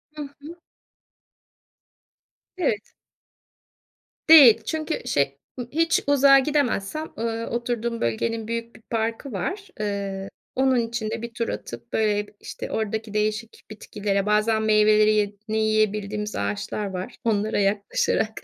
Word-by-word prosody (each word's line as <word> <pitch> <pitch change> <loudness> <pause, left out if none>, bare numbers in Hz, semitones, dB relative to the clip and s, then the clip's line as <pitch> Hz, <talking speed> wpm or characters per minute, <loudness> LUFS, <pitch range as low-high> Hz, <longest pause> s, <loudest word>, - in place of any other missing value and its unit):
Hı 300 - -6
hı. 290 +4 -12 2.0
Evet. 220 - -1 1.4
Değil 250 -9 +9
çünkü 315 0 -2
şey 140 - 0 0.2
ı 240 - -4
hiç 330 +2 +2
uzağa 275 -1 +6
gidemezsem, 290 0 -1
ııı, 230 0 -2
oturduğum 235 -1 -2
bölgenin 220 - -1
büyük 230 0 -4
bir - - -16
parkı 230 +4 -2
var. 390 - -4
Iıı, 200 -2 -3 0.3
onun 265 0 +3
için 230 -1 -2
de 230 0 -4
bir 235 0 -7
tur 235 -1 -2
atıp, 120 0 -7
böyle, 210 -1 +1
işte, - - -7
oradaki 220 0 -3
değişik 215 +1 -2
bitkilere, 205 -2 -2
bazen 215 +1 +2
meyvelerini 215 0 +3
yiyebildiğimiz 215 -1 0
ağaçlar 100 - -3
var. 190 +4 -5
Onlara 215 -2 0
yaklaşarak, 205 +2 0
220 Hz, 115 wpm, -24 LUFS, 210-240 Hz, 2.0 s, Değil